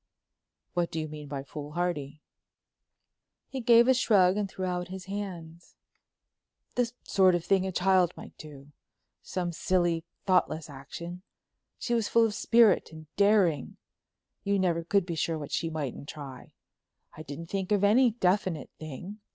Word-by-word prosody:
"What 175 -1 0
do 160 - -4
you 155 - -3
mean 150 -1 -9
by 140 -1 -5
foolhardy?" 150 0 -4 1.2
He 265 - -5
gave 235 0 +6
a 260 - +6
shrug 195 -7 +4
and 205 -1 -1
threw 190 0 -4
out 180 -1 -2
his 190 0 -8
hands. 175 -4 -7 1.0
"The 245 -2 0
sort 185 -2 +4
of 175 - -3
thing 190 -1 +2
a - - -2
child 185 -1 +3
might - - -11
do—some 150 +4 -8
silly, 175 -1 +1 0.2
thoughtless 165 -5 +1
action. 170 +6 -8 0.6
She 240 - -2
was 230 -3 +1
full 230 -1 +4
of 220 - -1
spirit 230 -5 +4
and 155 -1 -13
daring; 200 -6 +2 0.7
you 200 0 +1
never 175 -3 +1
could 195 +2 +2
be 175 - -4
sure 165 0 -1
of 155 - -5
what 145 - -7
she 165 - -1
mightn't 145 -3 -5
try. 135 -4 -9 0.6
I 155 - -9
didn't 155 +2 -8
think 195 0 -2
of 205 -1 +2
any 240 +5 +5
definite 185 - 0
thing. 160 +7 -8
180 Hz, 155 wpm, -28 LUFS, 155-200 Hz, 1.2 s, gave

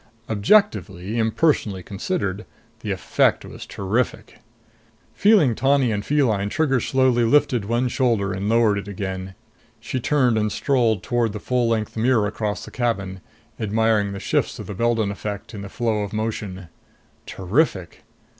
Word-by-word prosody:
Objectively, 110 - +1
impersonally 110 - +1
considered, 100 - -3 0.3
the 110 - -6
effect 95 - +1
was - - -10
terrific. 105 +5 -2 0.7
Feeling 200 - +4
tawny 135 0 +2
and 100 -1 -2
feline, 110 -9 +1
Trigger 135 0 +1
slowly 130 0 +2
lifted 125 -3 +2
one 120 +4 0
shoulder 115 -6 0
and 95 +3 -3
lowered 110 -3 +3
it 100 - -9
again. 95 -1 -5 0.4
She 130 +3 -4
turned 125 -4 +2
and 105 0 0
strolled 115 -8 +1
toward 120 -3 0
the 105 - -5
full 125 +1 0
length 110 -2 -1
mirror 115 -1 +2
across 105 -1 -3
the - - -11
cabin, 100 -6 -2 0.4
admiring 110 -1 +1
the 100 - -6
shifts - - -1
of - - -7
the 105 - -6
Beldon 115 0 +1
effect 100 +2 -6
in 100 - -6
the 100 - -7
flow 110 0 -1
of 100 0 -5
motion. 105 -5 -4 0.6
Terrific! 95 - -1
110 Hz, 145 wpm, -22 LUFS, 100-125 Hz, 0.7 s, Feeling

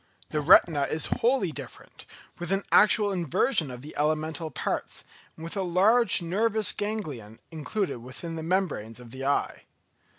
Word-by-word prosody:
The 150 - -1
retina 150 -2 +5
is 160 - +1 0.2
wholly 235 -7 +2
different, 140 -5 -11 0.3
with 175 +1 -4
an 195 +1 0
actual 210 -1 +5
inversion 175 - +1
of 125 0 -9
the 150 - -11
elemental 155 +1 -1
parts, 135 - -3 0.3
and 160 - -10
with 165 - -5
a 195 - -1
large 195 +4 +4
nervous 215 +4 +1
ganglion 150 - -5
included 165 - -3
within 130 +8 -7
the 160 - -5
membranes 160 - -2
of 120 -2 -13
the 130 +1 -8
eye. 140 - -1
165 Hz, 155 wpm, -26 LUFS, 145-200 Hz, 0.3 s, retina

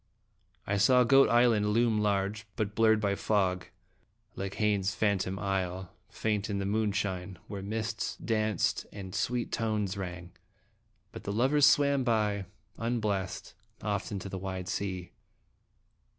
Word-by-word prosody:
I 100 - 0
saw 125 +5 +5
Goat 135 0 +6
Island 115 -2 +4
loom 115 -1 +3
large, 105 +1 0
but 105 -3 -2
blurred 110 0 +4
by 100 -2 +1
fog, 95 -3 0 0.7
like 95 0 -4
Heine's 105 -2 +1
phan 100 -3 +2
tom 95 +1 -3
isle, 95 -2 -2 0.2
faint 105 -1 -1
in 100 - -1
the 100 - -2
moonshine, 100 -3 -1
where 100 -1 -6
mists 110 +2 -3
danced 110 -4 0
and 95 -3 -8
sweet 120 -1 -1
tones 105 -3 -1
rang, 90 -2 -6 0.8
but - - -9
the 100 - -3
lovers 135 +7 +4
swam 140 -2 +4
by, 105 -4 +1 0.3
unblest, 105 -5 -2 0.3
off 100 -2 -2
into 100 -1 -4
the 95 -1 -5
wide 95 -1 -5
sea. 95 -2 -3
105 Hz, 135 wpm, -30 LUFS, 95-110 Hz, 0.8 s, Goat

